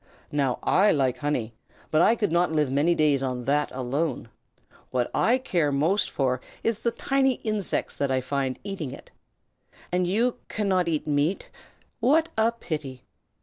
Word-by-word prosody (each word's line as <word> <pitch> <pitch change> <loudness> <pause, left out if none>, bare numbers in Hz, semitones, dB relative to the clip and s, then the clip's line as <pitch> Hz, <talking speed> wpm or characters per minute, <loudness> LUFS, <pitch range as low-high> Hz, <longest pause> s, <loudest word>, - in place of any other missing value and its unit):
Now 140 -4 +1
I 205 +3 +4
like 130 -3 +1
honey, 125 -6 -2 0.4
but 155 - +4
I 220 +6 +5
could 210 -6 -1
not 170 0 +2
live 150 -4 +1
many 150 +5 +3
days 150 -4 +3
on 125 -2 -2
that 145 +3 +1
alone. 130 0 -2 0.6
What 125 -1 -1
I 245 +3 +3
care 175 - 0
most 160 +9 +1
for 130 -2 0 0.2
is 230 -1 0
the 235 - +1
tiny 270 +2 +1
insects 215 -4 -2
that 140 - 0
I 130 0 +2
find 130 0 -2
eating 190 -9 -5
it. - - -12 0.8
And 180 0 +1
you 235 +7 +1
cannot 190 -4 0
eat 155 -3 -1
meat. 150 +5 0 0.5
What 310 +8 +3
a 220 +1 +3
pity! 150 - -6
155 Hz, 160 wpm, -26 LUFS, 135-205 Hz, 0.8 s, I